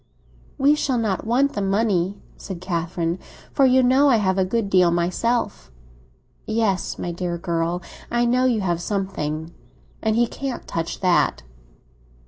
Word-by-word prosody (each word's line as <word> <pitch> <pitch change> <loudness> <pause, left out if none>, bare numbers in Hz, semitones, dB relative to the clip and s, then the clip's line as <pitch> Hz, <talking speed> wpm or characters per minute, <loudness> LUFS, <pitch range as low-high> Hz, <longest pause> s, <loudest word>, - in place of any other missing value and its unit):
"We 280 +2 +5
shall 275 -4 0
not 220 -3 -1
want 265 +5 +2
the 205 - -2
money," 195 -2 +1 0.2
said 190 -3 -7
Catherine; 170 -1 -2 0.3
"for 270 - +5
you 260 0 +4
know 265 +3 +5
I 255 - +5
have 190 -3 +1
a - - +4
good 205 +3 -1
deal 185 -2 +4
myself." 175 - -1 0.8
"Yes, 215 -4 0
my 175 - -3
dear 175 0 -3
girl, 170 0 -2 0.3
I 240 0 +1
know 250 +2 +2
you 235 -4 +2
have 175 -3 -1
something. 170 -5 -3 0.5
And 220 -1 +1
he 240 +1 +4
can't 265 +2 -5
touch 165 0 -4
that!" 185 -2 +2
195 Hz, 150 wpm, -22 LUFS, 175-235 Hz, 0.8 s, We